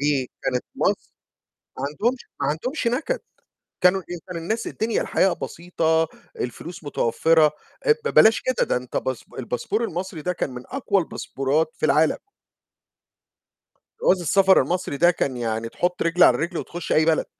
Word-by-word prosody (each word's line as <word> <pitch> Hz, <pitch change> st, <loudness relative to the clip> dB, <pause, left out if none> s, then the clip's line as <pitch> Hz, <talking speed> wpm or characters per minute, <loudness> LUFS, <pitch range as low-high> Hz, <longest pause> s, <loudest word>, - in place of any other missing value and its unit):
دي 140 Hz, -3 st, +1 dB
كانت 125 Hz, -1 st, -1 dB
مص -, -, -1 dB, 0.7 s
ما -, -, -4 dB
عندهمش 230 Hz, -, -1 dB, 0.2 s
ما -, -, +1 dB
عندهمش 240 Hz, -, -2 dB
نكد، 320 Hz, -, -1 dB, 0.6 s
كانوا 180 Hz, +1 st, +4 dB
إيه، 175 Hz, -, -4 dB
كان 180 Hz, -, -5 dB
الناس 180 Hz, +8 st, -2 dB
الدنيا 220 Hz, +1 st, -1 dB
الحياة 190 Hz, -, +2 dB
بسيطة، 160 Hz, -2 st, 0 dB, 0.3 s
الفلوس 165 Hz, +8 st, -6 dB
متوفّرة 155 Hz, +3 st, +3 dB, 0.3 s
آآ، 450 Hz, -, +7 dB
ب -, -, +1 dB
بلاش 220 Hz, +1 st, +7 dB
كده، 255 Hz, -1 st, 0 dB
ده -, -, +1 dB
أنت 125 Hz, 0 st, -5 dB
باس 130 Hz, -2 st, -2 dB
الباسبور 130 Hz, -, -2 dB
المصري 180 Hz, -3 st, -4 dB
ده 180 Hz, +3 st, 0 dB
كان 170 Hz, -, -3 dB
من 125 Hz, -1 st, -8 dB
أقوى 225 Hz, -7 st, 0 dB
الباسبورات 150 Hz, 0 st, -1 dB
في -, -, 0 dB
العالم. 155 Hz, +2 st, +3 dB, 1.9 s
جواز 185 Hz, -1 st, +4 dB
السفر 190 Hz, +3 st, +5 dB
المصري 175 Hz, -5 st, -2 dB
ده 175 Hz, +4 st, +5 dB
كان 140 Hz, -6 st, -2 dB
يعني 115 Hz, -1 st, -2 dB
تحُط 175 Hz, +8 st, -1 dB
رجل 170 Hz, +2 st, +2 dB
على 125 Hz, -, +7 dB
رجل 170 Hz, +2 st, -2 dB
وتخُش 175 Hz, -1 st, -5 dB
أي 155 Hz, -, +4 dB
بلد. 160 Hz, -1 st, +2 dB
165 Hz, 160 wpm, -23 LUFS, 145-190 Hz, 1.9 s, آآ